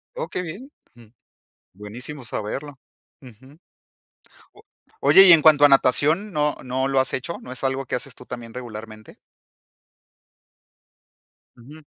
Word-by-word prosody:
Oh, - - -5
que - - -4
bien. 200 - -9 0.2
Ujú. 115 -3 -19 0.6
Buenísimo 120 +7 -8
saberlo. 135 +6 -6 0.4
Ujú. 130 +3 -17 1.0
O 420 - -20 0.4
oye, 195 - +7
y 175 - +10
en 160 - +5
cuanto 150 -1 +6
a - - +6
natación, 150 +9 +2
¿no 150 -2 -1
no 130 +1 -2
lo 135 -1 +1
has 130 - -1
hecho? 135 +6 -4
¿No 125 - -11
es 130 - -7
algo 135 0 -2
que - - -3
haces 125 +1 -6
tú 125 - -15
también 120 -2 -9
regularmente? 110 -3 -10 2.4
Ujú. 140 +6 -14
135 Hz, 140 wpm, -22 LUFS, 120-150 Hz, 2.4 s, y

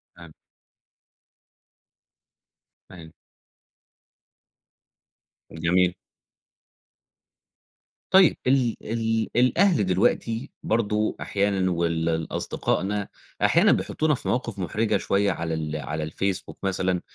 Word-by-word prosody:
تمام. 85 -3 -14 2.6
أيوه. 80 -4 -12 2.4
جميل. 90 +2 +1 2.2
طيّب. 190 -3 +6
ال 130 -3 +2 0.2
ال 115 -1 0
الأهل 125 - +3
دلوقتي 115 +7 0
برضو 110 -1 0
أحيانًا 100 -2 0
وال 85 -1 0
ال 80 -1 -1
أصدقائنا 100 +1 -2 0.3
أحيانًا - - +5
بيحطونا 155 -1 +1
في - - -4
مواقف 115 -5 -2
محرجة 105 +5 0
شويّة 100 +1 +1
على 80 0 -3
ال 80 -1 -3
على 75 0 -4
الFacebook 95 +1 -2
مثلًا، 95 -2 0
95 Hz, 85 wpm, -25 LUFS, 85-115 Hz, 2.6 s, طيّب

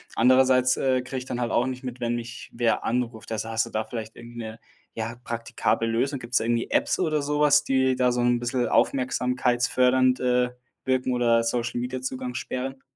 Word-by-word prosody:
Andererseits, 130 +1 +4
äh, 130 -1 +1
kriege 130 +1 -5
ich 125 - -9
dann 125 - -4
halt 120 -2 -1
auch 125 - +2
nicht 130 0 -5
mit, 125 -1 -6
wenn 120 0 0
mich 120 0 -7
wer 120 -2 +1
anruft. 115 -2 -2
Also, 110 0 -3
hast 115 0 0
du - - -10
da 110 0 -2
vielleicht 110 -2 -7
irgend 120 0 -12
'ne, 110 -1 -7 0.4
ja, 115 +1 -4
praktikable 115 -1 -1
Lösung? 125 +5 0
Gibt's 120 0 -1
da - - +1
irgendwie 115 0 -1
Apps - - +2
oder 155 -4 +1
so 145 +1 -1
was, 145 0 +5
die 130 -2 +2
da 125 -1 +2
so 125 - -1
'n 120 0 +2
bisschen 120 +1 -1
aufmerksamkeitsfördernd, 125 0 +2
äh, 125 0 +2 0.3
wirken, 130 -1 0
oder 115 -1 +3
Social-Media-Zugangs-Sperren? 125 +2 -3
125 Hz, 185 wpm, -25 LUFS, 120-130 Hz, 0.4 s, was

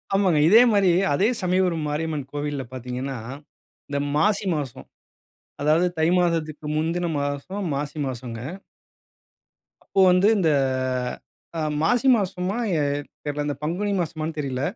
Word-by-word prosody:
ஆமாங்க. 185 -6 +3
இதே 220 +5 +8
மாரி 200 -3 +4 0.2
அதே 190 +9 +3
சமயபுரம் 180 -3 +1
மாரியம்மன் 150 -2 -3
கோவில்ல 145 -1 -3
பாத்தீங்கன்னா, 125 +1 -4 0.7
இந்த 140 0 -1 0.2
மாசி 200 +7 +2
மாசம். 140 -6 -5 0.7
அதாவது 155 +5 +3
தை 160 - +3
மாதத்துக்கு 160 -4 -1
முந்தின 165 +3 0
மாசம் 145 +8 -3
மாசி 145 +2 -4
மாசங்க. 120 -3 -5 1.5
அப்போ 195 - -2
வந்து, 180 +3 +4
இந்த 170 -5 +2 1.1
அ - - -1 0.2
மாசி 245 +10 +2
மாசமா 190 0 -2 0.2
எ - - +1 0.4
தெர்ல. 145 0 -2
இந்த 145 - -2
பங்குனி 180 +7 -1
மாசமான்னு 155 -1 -4
தெரில. 135 -3 -2
155 Hz, 120 wpm, -24 LUFS, 145-180 Hz, 1.5 s, இதே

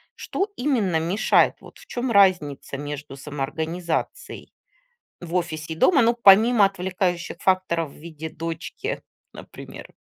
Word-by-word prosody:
Что 390 +3 -3
именно 225 - +1
мешает? 175 +6 +2
Вот - - -15
в - - -15
чём 245 0 -3
разница 180 -10 +2
между 145 -1 -7
самоорганизацией 160 +4 -4 0.7
в 175 -1 -7
офисе 160 -3 -2
и - - -14
дома? 280 - +4
Ну, 235 +1 +3
помимо 215 +2 +7
отвлекающих 180 -2 -2
факторов 185 -5 +1
в - - -17
виде 160 0 -8
дочки, 165 - -5 0.3
например. - - -11
175 Hz, 125 wpm, -23 LUFS, 160-200 Hz, 0.7 s, помимо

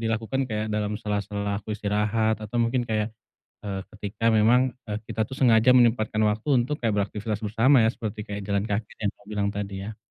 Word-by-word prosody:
dilakukan 115 +3 -1
kayak 110 -1 -2
dalam 105 0 -1
sela-sela 100 -1 -2
aku 105 - -20
istirahat, 105 +1 0
atau 110 +2 -5
mungkin 120 +1 +1
kayak, 110 0 -1 0.5
eee, 100 -2 -3 0.2
ketika 105 +2 -1
memang, 110 +2 +5 0.2
eee, 105 -2 -3
kita 110 - -1
tuh 110 - -14
sengaja 120 -1 +6
menyempatkan 115 -3 +3
waktu 105 +6 -2
untuk 130 +5 -2
kayak 115 -6 0
beraktivitas 105 +1 -2
bersama 115 +5 +4
ya, 110 - +4
seperti 110 -2 -4
kayak 100 0 -4
jalan 100 0 0
kaki 105 +1 -2
yang 105 - +1
kamu - - -23
bilang 100 -1 0
tadi 100 -1 -4
ya. 110 - -8
110 Hz, 190 wpm, -25 LUFS, 105-115 Hz, 0.5 s, sengaja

